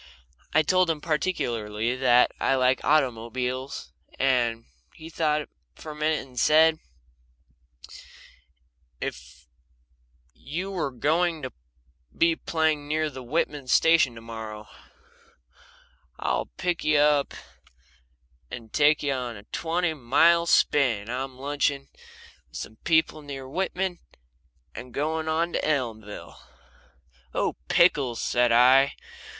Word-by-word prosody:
I 155 Hz, -, +4 dB
told 185 Hz, +2 st, +2 dB
him 160 Hz, -2 st, 0 dB
particularly 120 Hz, -, -2 dB
that 125 Hz, -1 st, +4 dB
I 135 Hz, -, +2 dB
like 130 Hz, 0 st, +2 dB
automobiles, 130 Hz, -1 st, -1 dB, 0.3 s
and 120 Hz, -4 st, +1 dB, 0.3 s
he 160 Hz, +1 st, -11 dB
thought 150 Hz, -2 st, +1 dB, 0.4 s
a 155 Hz, -, -8 dB
minute, 155 Hz, +1 st, 0 dB
and -, -, -13 dB
then 125 Hz, -, -18 dB
said: 155 Hz, +4 st, +4 dB, 2.2 s
"If -, -, -7 dB, 0.9 s
you 175 Hz, -, -5 dB
were 175 Hz, -7 st, -2 dB
going 155 Hz, +5 st, 0 dB
to 130 Hz, -, -5 dB, 0.6 s
be 165 Hz, 0 st, +3 dB
playing 160 Hz, -3 st, -1 dB
near 155 Hz, 0 st, -1 dB
the 130 Hz, -1 st, -8 dB
Whitman 145 Hz, +1 st, -2 dB
station 160 Hz, -2 st, +4 dB
to 115 Hz, -, -10 dB
morrow 110 Hz, -2 st, -8 dB, 1.5 s
I'd -, -, -3 dB
pick 180 Hz, -2 st, -2 dB
you 155 Hz, -1 st, +3 dB
up 145 Hz, -1 st, +2 dB, 1.1 s
and 115 Hz, -3 st, -9 dB
take 150 Hz, 0 st, +3 dB
you 140 Hz, -1 st, 0 dB
on 125 Hz, -3 st, -4 dB
a 100 Hz, -, -11 dB
twenty 165 Hz, 0 st, -1 dB
mile 160 Hz, +6 st, +3 dB
spin. 115 Hz, -11 st, +2 dB
I'm 130 Hz, +1 st, -4 dB
lunching 140 Hz, 0 st, -1 dB, 0.6 s
with -, -, -9 dB
some 110 Hz, -, -8 dB
people 160 Hz, -2 st, +2 dB
near 135 Hz, -2 st, -8 dB
Whitman, 185 Hz, +3 st, -2 dB, 0.7 s
and 125 Hz, -1 st, -10 dB
going 160 Hz, +2 st, -1 dB
on 165 Hz, +2 st, 0 dB
to -, -, -1 dB
Elmville." 115 Hz, -8 st, -3 dB, 1.0 s
"Oh, -, -, -1 dB
pickles!" 140 Hz, -9 st, +3 dB
said 120 Hz, 0 st, +1 dB
I. 130 Hz, +4 st, +5 dB
145 Hz, 115 wpm, -26 LUFS, 125-160 Hz, 2.2 s, I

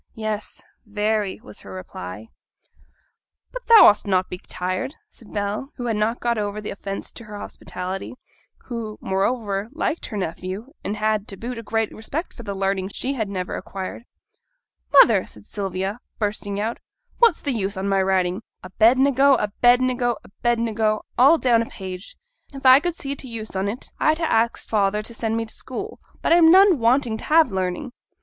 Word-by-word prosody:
'Yes, 215 Hz, -1 st, -4 dB, 0.2 s
very,' 210 Hz, -1 st, -1 dB
was 105 Hz, -, -9 dB
her 100 Hz, -, -11 dB
reply. 95 Hz, +3 st, -8 dB, 1.2 s
'But -, -, -8 dB
thou 460 Hz, -1 st, +9 dB
ought'st 210 Hz, -, +5 dB
not 185 Hz, -2 st, +3 dB
to -, -, -31 dB
be 180 Hz, -, -6 dB
tired,' 185 Hz, +12 st, -3 dB
said 230 Hz, -, -16 dB
Bell, 210 Hz, +7 st, -3 dB
who 245 Hz, -, -5 dB
had 230 Hz, -2 st, 0 dB
not 215 Hz, +2 st, +1 dB
yet -, -, -27 dB
got 235 Hz, -1 st, 0 dB
over 205 Hz, 0 st, -2 dB
the 210 Hz, -, -5 dB
offence 195 Hz, 0 st, -6 dB
to 230 Hz, -, -11 dB
her 210 Hz, -1 st, -8 dB
hospitality; 185 Hz, +1 st, -6 dB, 0.5 s
who, 225 Hz, -3 st, -5 dB
moreover, 200 Hz, +1 st, -1 dB
liked 320 Hz, +1 st, -2 dB
her 210 Hz, -, -5 dB
nephew, 190 Hz, -, -5 dB
and 210 Hz, -, -3 dB
had, 215 Hz, -1 st, 0 dB
to 195 Hz, -, -6 dB
boot, 240 Hz, +3 st, -5 dB
a -, -, -5 dB
great 225 Hz, 0 st, -1 dB
respect 280 Hz, +10 st, -5 dB
for -, -, -10 dB
the 200 Hz, -3 st, -5 dB
learning 195 Hz, -1 st, 0 dB
she 260 Hz, +6 st, -3 dB
had 220 Hz, -6 st, -2 dB
never 185 Hz, -2 st, -3 dB
acquired. 195 Hz, +4 st, -6 dB, 0.9 s
'Mother!' 230 Hz, -9 st, +7 dB
said 105 Hz, -1 st, -12 dB
Sylvia, 195 Hz, +2 st, -3 dB, 0.2 s
bursting 205 Hz, -1 st, -2 dB
out, 225 Hz, +3 st, -2 dB, 0.4 s
'what's 465 Hz, -8 st, +5 dB
the 280 Hz, -, -1 dB
use 200 Hz, -3 st, -2 dB
on 190 Hz, +1 st, -2 dB
my 195 Hz, -1 st, +2 dB
writing 190 Hz, 0 st, +1 dB, 0.2 s
"Abednego," 260 Hz, +8 st, +4 dB
"Abednego," 245 Hz, +2 st, +2 dB
"Abednego," 225 Hz, -1 st, 0 dB
all 280 Hz, +7 st, +6 dB
down 240 Hz, -6 st, +3 dB
a 230 Hz, -, -3 dB
page? 185 Hz, 0 st, -8 dB, 0.3 s
If 275 Hz, -1 st, -10 dB
I 260 Hz, +1 st, +9 dB
could 345 Hz, +2 st, -2 dB
see 280 Hz, -2 st, -4 dB
t' 270 Hz, -, -7 dB
use 220 Hz, -4 st, -7 dB
on 190 Hz, +1 st, 0 dB
't, 225 Hz, +6 st, -5 dB
I'd 310 Hz, 0 st, +3 dB
ha' -, -, -8 dB
axed 230 Hz, -6 st, +1 dB
father 210 Hz, 0 st, +1 dB
to 235 Hz, -, -9 dB
send 225 Hz, -1 st, -2 dB
me 230 Hz, -, -1 dB
t' 220 Hz, -, -10 dB
school; 400 Hz, -, -7 dB, 0.2 s
but -, -, +4 dB
I'm 335 Hz, -1 st, +7 dB
none 375 Hz, -2 st, +7 dB
wanting 235 Hz, 0 st, +2 dB
to -, -, -9 dB
have 315 Hz, -5 st, +4 dB
learning.' 190 Hz, +7 st, -2 dB
215 Hz, 185 wpm, -23 LUFS, 195-250 Hz, 1.2 s, thou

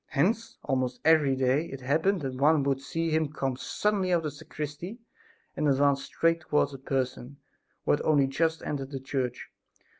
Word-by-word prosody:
Hence 220 Hz, +11 st, 0 dB
almost 130 Hz, -2 st, -1 dB
every 155 Hz, -4 st, +5 dB
day 130 Hz, +4 st, +2 dB
it 135 Hz, -, -7 dB
happened 160 Hz, +8 st, +1 dB
that 135 Hz, -2 st, -3 dB
one 145 Hz, +3 st, +3 dB
would 135 Hz, -1 st, 0 dB
see 165 Hz, +3 st, -2 dB
him 155 Hz, -2 st, +1 dB
come 135 Hz, -4 st, -2 dB
suddenly 195 Hz, +6 st, 0 dB
out 175 Hz, -, +5 dB
of 165 Hz, -, -4 dB
the 150 Hz, -, -2 dB
sacristy 150 Hz, -, -7 dB, 0.6 s
and 150 Hz, -, 0 dB
advance 140 Hz, 0 st, +3 dB
straight 165 Hz, 0 st, +1 dB
towards 150 Hz, -2 st, +1 dB
a 135 Hz, -, -8 dB
person 130 Hz, 0 st, -3 dB, 0.5 s
who -, -, +3 dB
had -, -, +2 dB
only 145 Hz, -3 st, +4 dB
just 160 Hz, +4 st, 0 dB
entered 135 Hz, -2 st, -3 dB
the 135 Hz, -2 st, -5 dB
church. 130 Hz, -2 st, -3 dB
145 Hz, 180 wpm, -28 LUFS, 135-160 Hz, 0.6 s, every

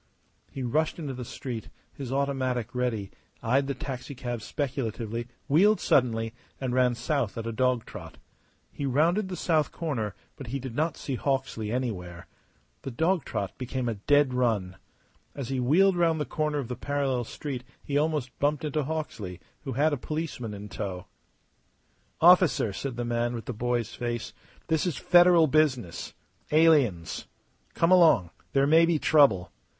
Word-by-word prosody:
He 135 Hz, -, -6 dB
rushed 155 Hz, +6 st, 0 dB
into 150 Hz, -5 st, -4 dB
the 125 Hz, 0 st, -6 dB
street, 120 Hz, -2 st, -6 dB, 0.2 s
his 135 Hz, -3 st, -6 dB
automatic 130 Hz, -4 st, -1 dB
ready, 120 Hz, -6 st, -2 dB, 0.3 s
eyed 135 Hz, +4 st, +2 dB
the 140 Hz, -, -2 dB
taxicab 125 Hz, -2 st, -5 dB
speculatively, 120 Hz, -3 st, -3 dB, 0.2 s
wheeled 200 Hz, +9 st, +4 dB
suddenly, 115 Hz, -3 st, +2 dB, 0.3 s
and 130 Hz, -2 st, -2 dB
ran 125 Hz, -1 st, +3 dB
south 120 Hz, -2 st, -1 dB
at 115 Hz, -, -4 dB
a 115 Hz, -, -2 dB
dog 125 Hz, 0 st, +1 dB
trot. -, -, -10 dB, 0.5 s
He 140 Hz, -, -3 dB
rounded 170 Hz, +9 st, +2 dB
the 185 Hz, -, -4 dB
south 155 Hz, -4 st, +1 dB
corner, 120 Hz, -, -3 dB, 0.2 s
but 135 Hz, -, -8 dB
he 130 Hz, +4 st, -2 dB
did 130 Hz, -3 st, -6 dB
not 160 Hz, +3 st, 0 dB
see 140 Hz, -, -4 dB
Hawksley 130 Hz, -6 st, -1 dB
anywhere. 95 Hz, -9 st, -4 dB, 0.6 s
The -, -, -5 dB
dog 160 Hz, +5 st, +1 dB
trot 100 Hz, -2 st, -3 dB
became 130 Hz, 0 st, -3 dB
a 115 Hz, -, 0 dB
dead 140 Hz, +6 st, +2 dB
run. 110 Hz, -8 st, 0 dB, 0.6 s
As 135 Hz, -4 st, -5 dB
he 135 Hz, -1 st, -1 dB
wheeled 180 Hz, +10 st, +4 dB
round 165 Hz, -2 st, +2 dB
the 150 Hz, -, -1 dB
corner 150 Hz, -1 st, -1 dB
of 140 Hz, -4 st, -3 dB
the 125 Hz, -, -4 dB
parallel 135 Hz, -1 st, -1 dB
street 130 Hz, +1 st, -6 dB, 0.2 s
he 140 Hz, -, -4 dB
almost 150 Hz, -4 st, 0 dB
bumped 145 Hz, +1 st, +1 dB
into 150 Hz, 0 st, -1 dB
Hawksley, 125 Hz, -, -4 dB, 0.3 s
who 135 Hz, -, -3 dB
had 150 Hz, +5 st, +2 dB
a -, -, 0 dB
policeman 135 Hz, -7 st, -4 dB
in 100 Hz, +1 st, -8 dB
tow. 95 Hz, -2 st, -5 dB, 1.1 s
"Officer," 175 Hz, -, +5 dB
said 135 Hz, +4 st, -4 dB
the 120 Hz, -, -2 dB
man 120 Hz, 0 st, -1 dB
with 115 Hz, -3 st, -6 dB
the 125 Hz, -, -4 dB
boy's 120 Hz, 0 st, -1 dB
face, 120 Hz, -1 st, -4 dB, 0.3 s
"this 160 Hz, +1 st, +1 dB
is 160 Hz, -7 st, -2 dB
Federal 175 Hz, -2 st, +6 dB
business. 135 Hz, -, 0 dB, 0.4 s
Aliens. 140 Hz, -, +3 dB, 0.5 s
Come 165 Hz, +2 st, +2 dB
along. 160 Hz, -, +5 dB, 0.2 s
There 135 Hz, 0 st, +4 dB
may 165 Hz, +3 st, +5 dB
be 170 Hz, -2 st, +2 dB
trouble. 140 Hz, -, +4 dB
130 Hz, 160 wpm, -27 LUFS, 115-150 Hz, 1.1 s, Federal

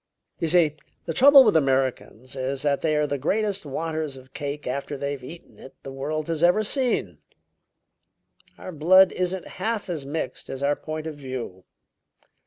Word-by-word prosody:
"You 165 Hz, -, 0 dB
see, 160 Hz, -2 st, +3 dB, 0.3 s
the 165 Hz, -, -3 dB
trouble 275 Hz, -, +8 dB
with 215 Hz, -7 st, +3 dB
Americans 130 Hz, -4 st, 0 dB
is 135 Hz, +1 st, -3 dB
that 145 Hz, -1 st, +1 dB
they 155 Hz, -2 st, +1 dB
are 150 Hz, 0 st, +2 dB
the 145 Hz, -1 st, -3 dB
greatest 200 Hz, +5 st, -1 dB
wanters 155 Hz, 0 st, -3 dB
of 130 Hz, 0 st, -16 dB
cake 145 Hz, 0 st, -5 dB
after 140 Hz, +2 st, -4 dB
they've 140 Hz, -1 st, -4 dB
eaten 165 Hz, +6 st, -12 dB
it 135 Hz, -, -13 dB
the 135 Hz, -, -7 dB
world 150 Hz, +3 st, -3 dB
has 165 Hz, -2 st, -2 dB
ever 180 Hz, +5 st, +4 dB
seen. 255 Hz, +3 st, -1 dB, 1.4 s
Our 185 Hz, -, -8 dB
blood 185 Hz, +4 st, +5 dB
isn't 185 Hz, 0 st, -2 dB, 0.2 s
half 215 Hz, -3 st, -2 dB
as 155 Hz, -5 st, -4 dB
mixed 145 Hz, 0 st, -5 dB
as 135 Hz, +1 st, -5 dB
our 145 Hz, +1 st, +2 dB
point 155 Hz, +1 st, -6 dB
of 160 Hz, -, -4 dB
view. 130 Hz, -10 st, -7 dB
150 Hz, 170 wpm, -24 LUFS, 135-175 Hz, 1.4 s, trouble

